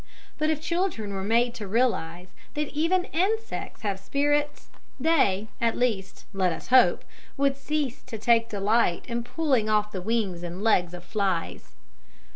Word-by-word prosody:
But 310 Hz, 0 st, +1 dB
if 310 Hz, -2 st, 0 dB
children 320 Hz, -, -2 dB
were 190 Hz, -1 st, -3 dB
made 235 Hz, +3 st, +2 dB
to 220 Hz, -5 st, -6 dB
realize 185 Hz, -6 st, 0 dB, 0.3 s
that 300 Hz, -1 st, -1 dB
even 335 Hz, +5 st, +1 dB
insects 435 Hz, +7 st, -1 dB
have 200 Hz, -2 st, -1 dB
spirits, 290 Hz, +6 st, 0 dB, 0.3 s
they, 250 Hz, -10 st, +2 dB
at 230 Hz, -1 st, +1 dB
least, 215 Hz, -6 st, -1 dB
let 190 Hz, -2 st, +1 dB
us 165 Hz, -, -7 dB
hope, 255 Hz, 0 st, +5 dB, 0.3 s
would 275 Hz, 0 st, +2 dB
cease 275 Hz, -2 st, -2 dB
to 230 Hz, -3 st, -5 dB
take 230 Hz, +1 st, +3 dB
delight 205 Hz, -2 st, +1 dB
in 235 Hz, -1 st, -3 dB
pulling 260 Hz, -5 st, 0 dB
off 210 Hz, 0 st, +2 dB
the 185 Hz, -, -4 dB
wings 205 Hz, -4 st, -1 dB
and 175 Hz, +3 st, -6 dB
legs 180 Hz, -6 st, +2 dB
of 175 Hz, -, -10 dB
flies. 190 Hz, -2 st, -2 dB
230 Hz, 155 wpm, -26 LUFS, 195-285 Hz, 0.3 s, hope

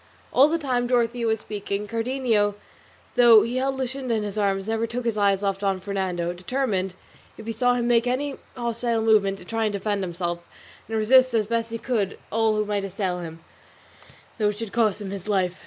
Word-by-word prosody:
All 275 Hz, +3 st, +7 dB
the 330 Hz, +2 st, +1 dB
time 250 Hz, -6 st, -1 dB
Dorothea 240 Hz, -1 st, +1 dB
was 220 Hz, -1 st, 0 dB
speaking, 205 Hz, 0 st, -4 dB
Cardenio, 230 Hz, -3 st, 0 dB, 0.6 s
though 235 Hz, -3 st, +7 dB
he 240 Hz, +2 st, -2 dB
held 270 Hz, +1 st, 0 dB
Luscinda 260 Hz, -2 st, -2 dB
in 215 Hz, -, -1 dB
his 205 Hz, -1 st, -4 dB
arms, 195 Hz, -1 st, 0 dB
never 225 Hz, +1 st, 0 dB
took 245 Hz, +1 st, -4 dB
his 230 Hz, -2 st, 0 dB
eyes 200 Hz, -1 st, +2 dB
off 195 Hz, -1 st, 0 dB
Don 195 Hz, -2 st, 0 dB
Fernando, 185 Hz, -3 st, -2 dB
determined, 190 Hz, -1 st, -2 dB, 0.4 s
if 220 Hz, -, -10 dB
he 230 Hz, -, -3 dB
saw 245 Hz, +1 st, +2 dB
him 240 Hz, -1 st, 0 dB
make 240 Hz, 0 st, +3 dB
any 275 Hz, +3 st, -1 dB, 0.2 s
hostile 235 Hz, -1 st, -1 dB
movement, 205 Hz, -3 st, +3 dB
to 180 Hz, -, -13 dB
try 225 Hz, +2 st, -1 dB
and 210 Hz, -, -1 dB
defend 200 Hz, 0 st, -1 dB
himself 175 Hz, -1 st, -3 dB, 0.5 s
and 225 Hz, -, -1 dB
resist 255 Hz, +3 st, +5 dB
as 215 Hz, -2 st, +2 dB
best 230 Hz, +1 st, -1 dB
he 230 Hz, -, -4 dB
could 220 Hz, -5 st, -1 dB
all 220 Hz, 0 st, +2 dB
who 215 Hz, 0 st, 0 dB
might 205 Hz, -1 st, -1 dB
assail 190 Hz, -2 st, -2 dB
him, 165 Hz, -1 st, -8 dB, 1.0 s
though 210 Hz, -1 st, +3 dB
it 210 Hz, -, -4 dB
should 225 Hz, -2 st, -5 dB
cost 220 Hz, -3 st, +2 dB
him 195 Hz, -2 st, -5 dB
his 195 Hz, -1 st, -7 dB
life. 185 Hz, -3 st, 0 dB
220 Hz, 205 wpm, -24 LUFS, 195-240 Hz, 1.0 s, All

